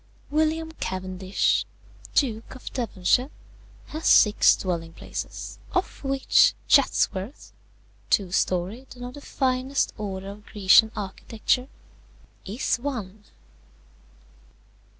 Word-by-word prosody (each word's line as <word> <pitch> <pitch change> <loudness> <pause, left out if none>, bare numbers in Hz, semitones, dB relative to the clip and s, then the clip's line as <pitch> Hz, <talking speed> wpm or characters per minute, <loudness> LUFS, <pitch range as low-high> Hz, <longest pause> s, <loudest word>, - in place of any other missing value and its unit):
"William 315 +1 +1
Cavendish, 185 +1 0 0.5
Duke 230 -3 0
of 255 - -9
Devonshire, 240 +1 +1 0.6
has 315 +2 -3
six 210 -1 +6
dwelling 165 -3 -3
places, - - -7
of 365 -5 -2
which 275 - +4
Chatsworth 250 -5 +1 0.6
(two 190 -3 +2
storied, 195 +9 -1
and 245 0 -8
of 250 - -7
the 285 - -10
finest 260 0 0
order 195 -2 -5
of 205 +1 -11
Grecian 210 +2 +5
architecture) 220 +5 -2 0.8
is 230 +3 -1
one. 220 -6 -5
225 Hz, 95 wpm, -25 LUFS, 190-270 Hz, 0.8 s, six